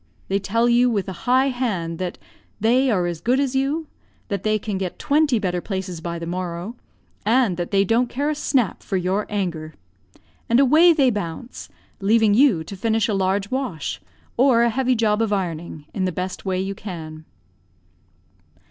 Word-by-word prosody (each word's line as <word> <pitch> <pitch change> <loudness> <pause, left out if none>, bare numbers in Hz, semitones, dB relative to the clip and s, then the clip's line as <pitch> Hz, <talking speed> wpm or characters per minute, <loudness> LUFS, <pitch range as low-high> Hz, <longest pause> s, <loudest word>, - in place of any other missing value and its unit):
They 195 +1 +1
tell 230 +4 +1
you, 240 +1 +4
with 205 -5 -1
a 190 - -4 0.2
high 260 +2 +4
hand, 195 -11 -2
that 180 -1 -3 0.4
"they 250 +5 +3
are 185 -6 +1
as 170 -2 -4
good 250 +3 +2
as 275 -2 0
you; 280 +4 0 0.4
that 200 -3 -2
they 215 +1 +1
can 210 -2 -4
get 185 -2 -4
twenty 290 -3 +2
better 180 -4 -1
places 190 -4 -5
by 170 0 -4
the 170 - -6
morrow, 175 +4 -4 0.5
and 230 -3 +3
that 175 -1 -3
they 195 -1 +3
don't 235 +4 +2
care 285 +5 -1
a - - 0
snap 265 - 0
for 195 - -2
your 185 +3 -1
anger." 170 -7 -3 0.7
And 235 +2 +4
away 310 +6 +6
they 275 -6 +3
bounce, 205 +4 -6 0.3
leaving 215 +1 +3
you 225 - +4
to 200 - -8
finish 220 +2 +1
a 215 - -1
large 195 +1 0
wash, 165 - -3 0.4
or 245 -2 +5
a 235 - +2
heavy 255 +1 +1
job 220 -1 +1
of 225 -2 0
ironing, 170 -5 -3
in 185 - -1
the 185 - 0
best 185 +3 -5
way 185 -1 0
you 195 +1 -2
can. 160 -6 -8
205 Hz, 185 wpm, -22 LUFS, 180-245 Hz, 0.7 s, away